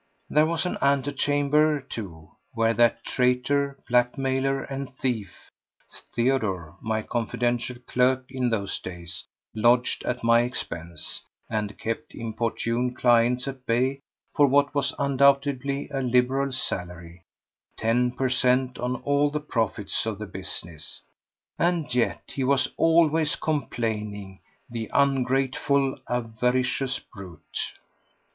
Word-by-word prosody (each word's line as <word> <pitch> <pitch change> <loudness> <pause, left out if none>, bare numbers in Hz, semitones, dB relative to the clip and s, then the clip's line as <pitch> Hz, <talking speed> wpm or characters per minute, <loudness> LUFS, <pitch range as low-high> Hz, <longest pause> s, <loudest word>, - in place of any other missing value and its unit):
There 150 +1 +5
was 165 +1 -1
an 180 - -2
antechamber, 145 +2 +2
too, 95 - -8 0.2
where 115 0 +2
that 120 0 +3
traitor, 135 +3 +1
blackmailer 130 +2 +1
and 135 -1 -6
thief, 115 -7 -3 0.6
Theodore, 110 -10 0
my 110 -1 -1
confidential 120 +1 -1
clerk 130 +1 +2
in 130 -2 0
those 100 -4 -1
days, 90 +1 -7 0.3
lodged 120 +3 +3
at 125 -1 -2
my 115 0 +5
expense 85 -9 -4 0.3
and 105 -2 -2
kept 115 0 -4
importunate 115 +2 -2
clients 120 +1 +3
at 135 -2 -7
bay 130 +4 +1 0.3
for 145 - +5
what 140 +1 +3
was 140 -1 +1
undoubtedly 140 0 +2
a 135 -1 -1
liberal 130 +2 +2
salary—ten 95 +5 -3
per 130 +1 0
cent, 125 0 +2
on 125 +1 -1
all 145 +1 +3
the 150 +1 -2
profits 115 -7 -1
of 110 -3 -2
the 110 - -5
business—and 95 - -4
yet 125 -2 +1
he 135 - -4
was 130 0 +3
always 165 -1 +3
complaining, 105 -9 -3 0.3
the 115 -3 -5
ungrateful, 135 0 +2
avaricious 125 +3 0
brute! 95 -7 -7
125 Hz, 110 wpm, -26 LUFS, 115-140 Hz, 0.6 s, There